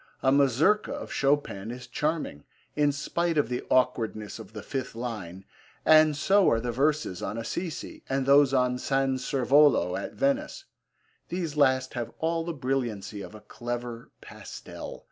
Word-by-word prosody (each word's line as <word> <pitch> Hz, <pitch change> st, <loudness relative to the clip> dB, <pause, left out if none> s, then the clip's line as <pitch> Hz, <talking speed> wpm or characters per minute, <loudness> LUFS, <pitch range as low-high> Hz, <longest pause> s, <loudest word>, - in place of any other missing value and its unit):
A 130 Hz, -, +4 dB
Mazurka 140 Hz, -, +3 dB
of -, -, -6 dB
Chopin 135 Hz, -8 st, 0 dB
is 125 Hz, +1 st, -7 dB
charming, 150 Hz, -, -2 dB, 0.3 s
in 145 Hz, -1 st, +3 dB
spite 165 Hz, +4 st, -1 dB
of 145 Hz, -6 st, +2 dB
the 125 Hz, -, -2 dB
awkwardness 115 Hz, -4 st, 0 dB
of 110 Hz, -, -11 dB
the 105 Hz, -, -7 dB
fifth 135 Hz, -4 st, -4 dB
line, 105 Hz, -6 st, -6 dB, 0.4 s
and 155 Hz, -1 st, +6 dB
so 195 Hz, +5 st, +4 dB
are 115 Hz, -, +2 dB
the 120 Hz, +1 st, -2 dB
verses 140 Hz, -6 st, 0 dB
on 105 Hz, +3 st, -4 dB
Assisi, 160 Hz, +8 st, -5 dB
and 135 Hz, 0 st, 0 dB
those 140 Hz, 0 st, +6 dB
on 125 Hz, -1 st, +1 dB
San 135 Hz, 0 st, 0 dB
Servolo 130 Hz, -, +3 dB
at -, -, -5 dB
Venice. 280 Hz, +6 st, -1 dB, 0.6 s
These 170 Hz, -4 st, -3 dB
last 130 Hz, -3 st, +2 dB
have 120 Hz, -2 st, -4 dB
all 165 Hz, 0 st, 0 dB
the 170 Hz, -, -3 dB
brilliancy 120 Hz, -8 st, -3 dB
of 105 Hz, -, -9 dB
a 105 Hz, -, -11 dB
clever 120 Hz, 0 st, -6 dB
pastel. -, -, -9 dB
130 Hz, 155 wpm, -27 LUFS, 115-150 Hz, 0.6 s, and